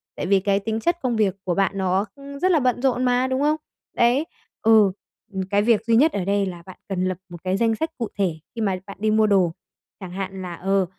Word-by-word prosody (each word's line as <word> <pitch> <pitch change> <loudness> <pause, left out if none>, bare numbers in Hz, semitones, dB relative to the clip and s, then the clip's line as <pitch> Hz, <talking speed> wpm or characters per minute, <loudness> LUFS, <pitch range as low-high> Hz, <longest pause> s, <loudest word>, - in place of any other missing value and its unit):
tại - - -4
vì 195 0 +4
cái 200 +1 +1
tính 220 +2 -2
chất 345 +8 +1
công 250 -3 0
việc 210 -4 +2
của 180 -2 0
bạn 195 +1 +2
nó, 190 +1 +1
ưm, 280 0 -10
rất 370 +4 +3
là 325 - +4
bận 250 -2 +1
rộn 255 -2 +1
mà, 250 +1 +2
đúng 260 +1 -1
không? 300 +1 +3 0.4
Đấy, 245 +6 +3 0.4
ừ. 220 -3 +5 0.4
Ừm, 190 - -2
cái 205 0 +3
việc 220 0 +2
duy 230 0 +3
nhất 300 +7 +5
ở 190 - -2
đây 200 0 +1
là 175 -3 -7
bạn 185 - -11
cần 185 -1 -1
lập 185 -1 -1
một 175 -1 -11
cái 185 +1 0
danh 225 +1 +2
sách 320 +8 -2
cụ 230 - -2
thể 190 -5 +1 0.2
khi 230 - -3
mà 195 -3 +1
bạn 200 - -9
đi 215 0 +2
mua 215 0 +4
đồ, 185 -5 +3 0.5
chẳng 185 -2 -8
hạn 190 0 -5
là, 180 -2 -5
ờ, 195 +2 +1
205 Hz, 255 wpm, -23 LUFS, 190-245 Hz, 0.5 s, ừ